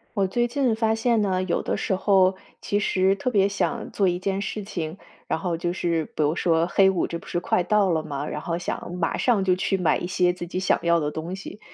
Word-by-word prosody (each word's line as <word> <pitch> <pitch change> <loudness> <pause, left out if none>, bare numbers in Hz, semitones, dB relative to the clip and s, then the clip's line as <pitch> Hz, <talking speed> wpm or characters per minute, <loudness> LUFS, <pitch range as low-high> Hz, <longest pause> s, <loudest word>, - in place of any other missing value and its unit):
我 195 -1 +2
最 240 +5 0
近 255 -2 +1
发 220 0 +1
现 225 0 +2
呢， 185 -2 0
有 180 - 0
的 - - -2
时 - - -1
候 190 -1 +3 0.2
其 205 - 0
实 190 -2 +2
特 255 - -1
别 200 -4 +3
想 225 +3 -2
做 195 - +1
一 175 -1 +1
件 195 +1 -2
事 210 +1 -4
情。 170 -4 -5 0.3
然 - - -1
后 170 -1 -2
就 175 +1 -2
是 170 -3 -1
比 - - -1
如 150 +2 +1
说 165 -1 +2
黑 190 +2 +4
五 190 -2 0
这 170 - -4
不 - - -14
是 - - -2
快 180 - +1
到 200 +1 +2
了 160 -2 +1
嘛， 140 0 -4
然 150 - -4
后 170 +2 -3
想 175 0 -5
马 180 - -1
上 230 -6 +2
就 185 -1 +3
去 190 +1 0
买 180 -4 +2
一 - - -4
些 180 -1 +2
自 180 -1 -6
己 180 - -5
想 190 - +2
要 170 -1 +3
的 150 0 -1
东 165 +4 -5
西。 195 +2 -9
185 Hz, 270 characters per minute, -24 LUFS, 170-200 Hz, 0.3 s, 黑